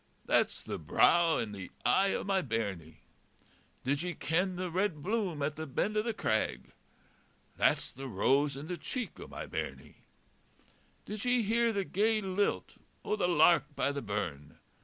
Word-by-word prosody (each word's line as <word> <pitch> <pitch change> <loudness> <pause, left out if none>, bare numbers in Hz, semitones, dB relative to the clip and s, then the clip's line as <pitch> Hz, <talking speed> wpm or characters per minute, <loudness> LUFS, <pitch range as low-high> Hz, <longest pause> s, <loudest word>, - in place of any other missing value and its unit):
That's - - +2
the - - -5
brow 170 -1 +4
and 110 -3 -3
the 95 -2 -7 0.2
eye 195 +11 +4
o' - - -2
my 195 -1 +1
bairnie. 100 - -4 0.8
Did 140 +3 0
ye 175 0 -3
ken 180 +5 0
the 180 -1 -3
red 180 -4 0
bloom 190 -8 -1
at 150 +1 -2
the 160 0 -4
bend 205 +10 -1
o' 215 - +3
the 230 +2 -1
crag? 110 - -1 0.8
That's - - +1
the 135 +1 -7
rose 135 +6 +2
in 140 - -6
the 175 +2 -4
cheek 250 - -5
o' - - -8
my - - -7
bairnie. - - -6 1.1
Did 210 -1 -5
ye 245 -1 +2
hear 230 +2 +2
the 200 -3 -1
gay 215 +4 +2
lilt 195 0 -1 0.3
o' - - +1
the 195 -4 +1
lark 170 -3 +4
by - - +1
the 140 0 -4
burn? 90 - -4
175 Hz, 170 wpm, -31 LUFS, 135-200 Hz, 1.1 s, brow